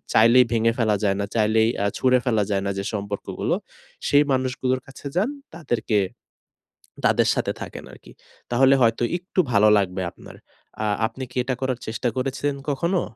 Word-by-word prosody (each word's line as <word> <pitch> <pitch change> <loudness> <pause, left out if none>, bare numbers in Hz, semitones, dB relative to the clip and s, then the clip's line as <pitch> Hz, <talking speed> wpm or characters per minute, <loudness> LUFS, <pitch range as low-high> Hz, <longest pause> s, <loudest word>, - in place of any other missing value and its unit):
চাইলেই 115 +3 +6
ভেঙে 115 0 +3
ফেলা 110 -3 +2
যায় 100 -1 +2
না, 100 - 0
চাইলেই 110 0 +3
আ - - +1
ছুঁড়ে 130 -1 +4
ফেলা 110 -4 +2
যায় 100 -1 0
না - - 0
যে 100 - -3
সম্পর্কগুলো; 100 -1 -3 0.5
সেই 145 0 +5
মানুষগুলোর 130 0 0
কাছে 135 +1 -12
যান। 200 +6 +2 0.3
তাদেরকে, 120 -10 -1 1.1
তাদের - - +3
সাথে - - -1
থাকেন - - -7
আরকি। - - -15 0.4
তাহলে 135 +3 +5
হয়তো 115 0 +3
একটু 180 +1 -5
ভালো 105 -1 +5
লাগবে 95 -2 -1
আপনার। - - -14 0.5
আ - - 0 0.2
আপনি 130 +3 -8
কি - - -8
এটা 130 0 -2
করার 130 -2 -1
চেষ্টা 115 +2 -1
করেছিলেন 135 +2 -1
কখনো? 170 +6 0
120 Hz, 165 wpm, -23 LUFS, 110-130 Hz, 1.1 s, চাইলেই